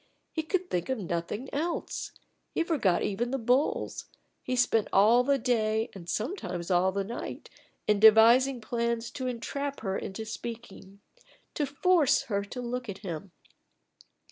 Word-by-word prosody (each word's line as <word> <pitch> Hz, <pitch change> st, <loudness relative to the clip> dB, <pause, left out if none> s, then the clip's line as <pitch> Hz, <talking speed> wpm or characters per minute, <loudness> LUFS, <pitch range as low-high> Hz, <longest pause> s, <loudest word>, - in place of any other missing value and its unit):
He 320 Hz, -, 0 dB
could 360 Hz, +3 st, -1 dB
think 175 Hz, +4 st, -1 dB
of 260 Hz, -, 0 dB
nothing 180 Hz, +5 st, -3 dB
else; 330 Hz, +4 st, -3 dB, 0.4 s
he -, -, +2 dB
forgot 275 Hz, -, +1 dB
even 235 Hz, +4 st, -1 dB
the 270 Hz, -, -1 dB
bulls; 250 Hz, +4 st, 0 dB, 0.4 s
he 255 Hz, -, -2 dB
spent 230 Hz, -3 st, +2 dB
all 220 Hz, +5 st, +5 dB
the 280 Hz, +2 st, +2 dB
day 225 Hz, -3 st, 0 dB
and 175 Hz, -3 st, -10 dB
sometimes 195 Hz, -, -3 dB
all 180 Hz, +1 st, +3 dB
the 200 Hz, +1 st, -1 dB
night 230 Hz, +5 st, -7 dB, 0.3 s
in 210 Hz, -1 st, +2 dB
devising 230 Hz, +4 st, +6 dB
plans 235 Hz, 0 st, -2 dB
to 260 Hz, -2 st, -4 dB
entrap 280 Hz, +4 st, -4 dB
her 195 Hz, -3 st, -2 dB
into 210 Hz, +4 st, -5 dB
speaking, 220 Hz, -3 st, -8 dB, 0.5 s
to 295 Hz, -, -1 dB
force 295 Hz, 0 st, +3 dB
her 200 Hz, -6 st, -1 dB
to 250 Hz, +5 st, -6 dB
look 245 Hz, -1 st, -4 dB
at 200 Hz, +1 st, -7 dB
him. 175 Hz, +2 st, -5 dB
235 Hz, 150 wpm, -29 LUFS, 200-260 Hz, 0.5 s, devising